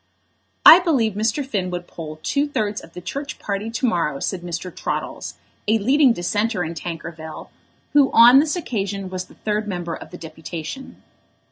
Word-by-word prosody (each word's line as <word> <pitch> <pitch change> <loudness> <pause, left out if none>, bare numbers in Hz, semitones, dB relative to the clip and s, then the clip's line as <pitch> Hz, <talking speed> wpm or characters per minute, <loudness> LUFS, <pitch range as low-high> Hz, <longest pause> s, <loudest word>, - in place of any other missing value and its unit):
"I 335 - +12
believe 270 - +1
Mr. 220 +7 0
Finn 200 -8 -2
would 175 0 -4
poll 155 -3 -8
two 285 +1 +1
thirds 215 -7 -2
of - - -15
the 180 - -8
Church 280 +11 -5
party 205 +2 -3
to 230 +3 -2
morrow," 165 - 0
said 185 +3 -2
Mr. 175 +1 -5
Troddles, - - -4 0.3
a 220 +2 +4
leading 265 +5 +4
dissenter 205 +1 0
in 165 0 -4
Tankerville, 165 -1 -7 0.4
who 285 -2 +5
on 240 +3 +8
this 300 +3 +1
occasion 200 - -3
was 185 0 -4
the - - -19
third 210 0 -2
member 175 -4 -3
of - - -8
the 180 - -9
deputation. 160 - -8
200 Hz, 170 wpm, -22 LUFS, 175-245 Hz, 0.4 s, I